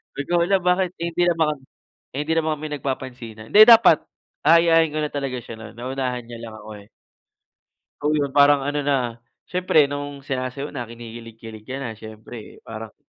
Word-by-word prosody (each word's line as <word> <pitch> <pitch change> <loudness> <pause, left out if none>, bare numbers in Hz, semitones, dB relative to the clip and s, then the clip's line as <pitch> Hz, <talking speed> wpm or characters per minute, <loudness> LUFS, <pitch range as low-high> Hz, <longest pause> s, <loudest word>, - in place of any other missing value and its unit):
Sabi - - -3
ko, 175 - +3
hala 175 +4 +2
bakit 180 0 +1
hindi 170 +1 -1
naman, 160 -4 +1 0.5
eh, 145 +3 -4
hindi 160 - +1
naman 160 -2 0
kami 155 - -6
nagpapansinan. 125 -5 -6
Hindi 210 - +10
dapat, 225 -8 +7 0.4
aayain 165 0 +5
ko 155 - -4
na 150 -1 -2
talaga 135 -3 -3
siya 115 -1 -9
no'n 110 0 -12
naunahan 125 0 -3
niya 120 0 -9
lang 115 -2 -8
ako, 105 0 -12
eh. 100 - -21 1.1
Oh, 150 +1 +1
'yun 145 -2 -1
parang 145 0 +5
ano 145 +1 -2
na, 145 -1 +1 0.5
siyempre 180 -4 +2
nung 145 0 -5
sinasayaw 135 +1 -4
na 120 - -6
kinikilig-kilig 115 -1 -11
ka 130 - -5
na 120 - -4
siyempre 110 +1 -11
parang 110 -1 -9
140 Hz, 175 wpm, -22 LUFS, 120-155 Hz, 1.1 s, Hindi